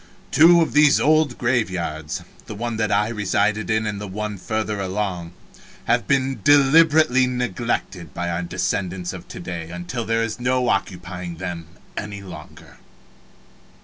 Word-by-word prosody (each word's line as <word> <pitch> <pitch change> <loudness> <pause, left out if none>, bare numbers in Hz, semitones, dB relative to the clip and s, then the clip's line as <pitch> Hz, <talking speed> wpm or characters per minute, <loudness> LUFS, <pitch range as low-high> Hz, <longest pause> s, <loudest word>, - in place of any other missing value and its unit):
Two 170 +1 +7
of - - -4
these 150 -1 +5
old 155 -4 +3
graveyards 90 - -2 0.2
the 105 - -6
one 115 +1 -3
that 110 -1 0
I 105 +2 +2
resided 105 0 0
in 110 0 +1
and 105 -2 -3
one 105 0 -4
further 110 +1 -2
along 95 -3 -3 0.5
have 120 0 +1
been 135 -4 +1
deliberately 145 -2 +5
neglected 120 - -3
by 85 +4 -3
our 85 +1 -2
descendants 90 0 -2
of - - -9
to - - -9
day 85 -2 -6
until 90 +8 -5
there 115 0 0
is 115 0 -4
no 125 0 +1
occupying 90 -2 -3
them 85 -2 -6 0.3
any 100 -1 -6
longer. 80 -5 -12
105 Hz, 145 wpm, -22 LUFS, 90-125 Hz, 0.5 s, Two